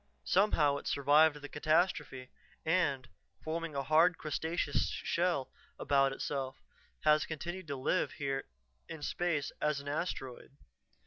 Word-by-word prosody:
Somehow 155 -8 +3
it - - -8
survived 145 +2 +4
the - - -5
catastrophe, 150 -4 0 0.3
and, 145 -7 +1 0.4
forming 165 -1 -3
a 140 - -1
hard, 160 +4 +4
crustaceous 155 -1 -1
shell 170 -6 -1 0.3
about 135 -1 +2
itself, 135 -1 -4 0.4
has 155 0 +4
continued 175 +3 -5
to 140 - -3
live 135 +7 0
here 135 -3 -3 0.4
in 155 -2 -7
space 160 -3 -1
as 150 -1 +1
an 140 - -10
asteroid. 140 -3 -4
150 Hz, 125 wpm, -33 LUFS, 140-165 Hz, 0.4 s, survived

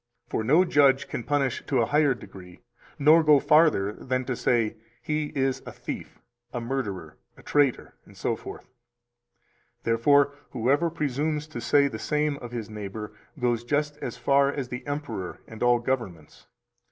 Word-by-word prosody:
For - - -1
no 155 +11 +4
judge 140 -4 +4
can 120 - -5
punish 140 -3 0
to 135 - +1
a 115 - +3
higher 145 -1 +3
degree 90 -6 -13 0.4
nor 155 +3 +6
go 150 -2 +6
farther 150 -11 +4
than 130 +2 -3
to 130 - -2
say: 115 -2 +1 0.2
"He 150 +4 -2
is 135 -1 0
a - - -8
thief, - - -7 0.3
a 120 - -3
murderer, 110 -10 -4 0.2
a - - -16
traitor," 145 -4 +1 0.2
etc. - - -4 1.2
Therefore, 140 +5 +3 0.2
whoever 140 +9 +2
presumes 150 0 -2
to 120 -6 -6
say 140 +5 +4
the 110 -5 -6
same 150 -1 0
of 120 -3 -9
his 115 -3 -5
neighbor 105 0 -7 0.3
goes 120 -2 0
just 150 +3 -1
as - - -6
far 140 0 +3
as 135 -4 -4
the 125 0 -6
emperor 145 -11 -4
and 110 - -11
all 120 0 +4
governments. 120 -11 -4
130 Hz, 155 wpm, -26 LUFS, 115-145 Hz, 1.2 s, nor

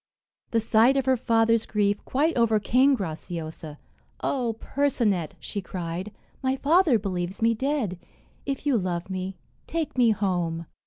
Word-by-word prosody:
The 230 - +2
sight 225 +4 +4
of 270 - +1
her 260 0 +4
father's 230 -2 +2
grief 205 -1 0
quite 305 +5 +1
overcame 235 +4 +3
Graciosa. 160 -4 -6 0.5
"Oh, 240 -5 -1
Percinet!" 225 - 0
she 200 - -5
cried, 180 +1 -5 0.3
"my 260 0 +1
father 305 -1 +4
believes 185 -2 -3
me 230 0 +3
dead. 230 -7 -1 0.4
If 275 0 -4
you 270 -6 +3
love 180 0 -3
me, 185 0 -4 0.3
take 320 -5 -2
me 240 -2 +6
home." 175 -5 -1
220 Hz, 140 wpm, -26 LUFS, 185-260 Hz, 0.5 s, me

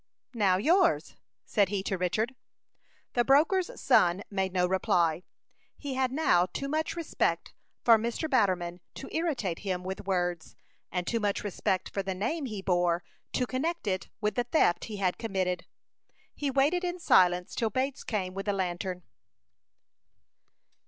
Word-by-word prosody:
"Now, 200 -6 +3
yours?" 340 - +3 0.3
said 200 -4 +2
he 200 -1 -2
to 195 - -1
Richard. 190 +7 -1 0.8
The 240 - +3
broker's 320 +8 +3
son 180 +3 +3
made 190 -1 -1
no 180 -1 +2
reply. 175 -3 +1 0.6
He 285 -2 -5
had 260 -1 0
now 220 - +3
too 275 +9 -4
much 310 +2 -1
respect 335 -2 -1 0.3
for 230 -2 +7
Mr. 235 +8 -2
Batterman 185 - +1 0.2
to 270 - -8
irritate 275 - -1
him 185 -3 -3
with 190 +1 -6
words, 175 -3 -1 0.4
and 180 -1 -2
too 230 - 0
much 205 -2 -1
respect 190 -2 -1
for 200 - -3
the 190 -1 -3
name 275 - -2
he 210 -4 -6
bore 175 -2 +1 0.3
to 250 - +1
connect 315 +7 -2
it 190 -2 -2
with 210 -1 0
the 245 +2 0
theft 240 - +2
he 215 -2 -6
had 185 -2 0
committed. 185 -5 -2 0.7
He 290 - -2
waited 285 +7 +2
in 355 0 -2
silence 180 - +3
till 225 - 0
Bates 260 +5 -2
came 190 -5 -2
with 195 +2 -5
the 205 - +2
lantern. 180 -1 -3
200 Hz, 155 wpm, -29 LUFS, 180-265 Hz, 0.8 s, for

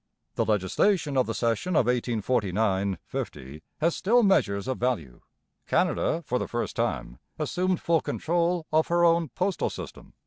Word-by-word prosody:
The - - 0
legislation 140 - +1
of 130 - +2
the 115 - -3
session 115 - 0
of 125 - +4
1849 110 -5 0
50 70 +4 -6 0.2
has 165 +2 +2
still 240 +5 +3
measures 100 - +2
of 130 - -2
value. 105 - -2 0.5
Canada 170 - +1
for 125 -1 -1
the - - -3
first 120 0 -3
time - - -2 0.2
assumed 185 0 0
full 165 -1 +2
control 170 0 0
of 155 0 +3
her 175 0 +3
own 165 -2 +3
postal 185 +5 -1
system. - - -9
130 Hz, 150 wpm, -27 LUFS, 105-170 Hz, 0.5 s, of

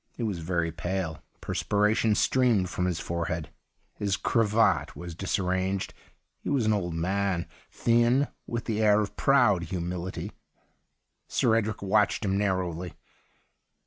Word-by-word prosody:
He 120 - -3
was 100 -6 -2
very 85 0 -1
pale; 90 -1 -3 0.2
perspiration 105 +1 +1
streamed 115 -7 +2
from 90 - -1
his 90 -3 -1
forehead; 85 -2 -3 0.4
his 100 -1 -1
cravat 115 -1 +2
was 85 -1 -7
disai'ranged. 95 +1 -1 0.5
He - - -5
was 135 -6 +1
an 110 - +3
old 90 -5 -2
man, 95 +1 0 0.2
thin, 120 +4 +3 0.2
with 120 -1 -3
the 110 -1 -1
air 105 -1 +5
of 105 - -4
proud 120 -11 +3
humility. 90 +1 -4 1.0
Sir 115 - +2
Edric 110 -2 -1
watched 105 +2 +2
him 95 0 +1
narrowly. 90 -4 -1
95 Hz, 130 wpm, -27 LUFS, 90-110 Hz, 1.0 s, air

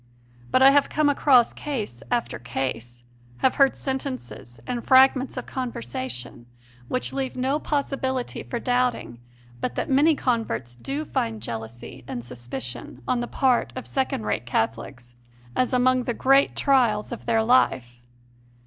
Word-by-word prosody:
But 260 - +4
I 270 - +9
have 285 0 +3
come 305 -1 +2
across 265 -4 +4
case 215 - -5
after 240 - -1
case, 120 0 -4 0.4
have 260 - +4
heard 275 - +5
sentences 260 - -5
and 240 -1 -3
fragments 265 0 +4
of 255 - -4
conversation 125 - -5 0.4
which 255 - -2
leave 265 -1 -3
no 265 +4 0
possibility 270 -4 -2
for 240 - -5
doubting 245 - -1 0.4
but 120 - -3
that - - -2
many 295 +4 +5
converts 130 - -2
do 275 - -4
find 110 - -2
jealousy 115 +3 -7
and 120 - -5
suspicion 120 +1 -7
on 255 - +1
the 240 - -3
part 255 -2 +1
of 255 - -6
second 265 - -1
rate 105 +2 -2
Catholics 120 +2 -3 0.4
as 255 - +1
among 255 0 +3
the 240 - -2
greatest 275 +1 +3
trials 240 -6 +2
of 240 - -7
their 225 -1 +3
life. 125 - +2
240 Hz, 145 wpm, -24 LUFS, -, 0.4 s, I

